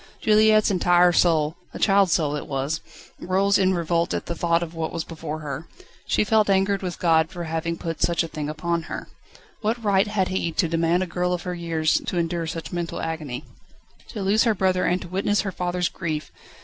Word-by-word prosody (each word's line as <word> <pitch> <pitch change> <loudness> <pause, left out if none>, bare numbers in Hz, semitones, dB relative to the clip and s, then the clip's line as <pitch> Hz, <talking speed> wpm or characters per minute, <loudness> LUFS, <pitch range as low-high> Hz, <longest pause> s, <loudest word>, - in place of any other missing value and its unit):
Juliette's 215 0 +4
entire 175 -1 +4
soul 160 -2 +2 0.2
a - - -3
child's 195 -3 +4
soul 150 -3 +1
it 150 - -5
was 140 +3 -2 0.4
rose 195 +2 +2
in 190 -1 +3
revolt 170 0 0
at - - -3
thought 170 0 0
of 165 -1 -7
what 165 -1 -3
was 165 - -3
before 155 -2 -6
her. 150 +2 -6 0.4
She - - +2
felt 215 -1 +3
angered 195 0 +2
with 180 -2 -4
God 160 -2 +3
for 175 -2 -6
having 165 +1 -2
put 165 -2 -5
such 170 0 +2
a - - -4
thing 150 -2 -5
upon 170 +2 -1
her. - - -6 0.5
What 225 +2 -2
right 200 0 +3
had 200 -3 0
He 185 -3 -1
to 170 - +1
demand 165 +2 +1
a - - -2
girl 180 0 -1
of 175 - -3
her 180 - -3
years 165 -2 0
to 180 - -2
endure 170 -1 -1
so 165 - -4
much 165 - -7
mental 175 -1 -3
agony? 155 -6 -4 0.6
To 205 - -5
lose 205 +3 +3
her 225 -2 +3
brother, 185 -1 +1
and 180 - +1
to - - -9
witness 195 +3 +1
her 195 - -3
father's 180 -1 -1
grief! 155 -4 -4
175 Hz, 210 wpm, -24 LUFS, 165-190 Hz, 0.6 s, Juliette's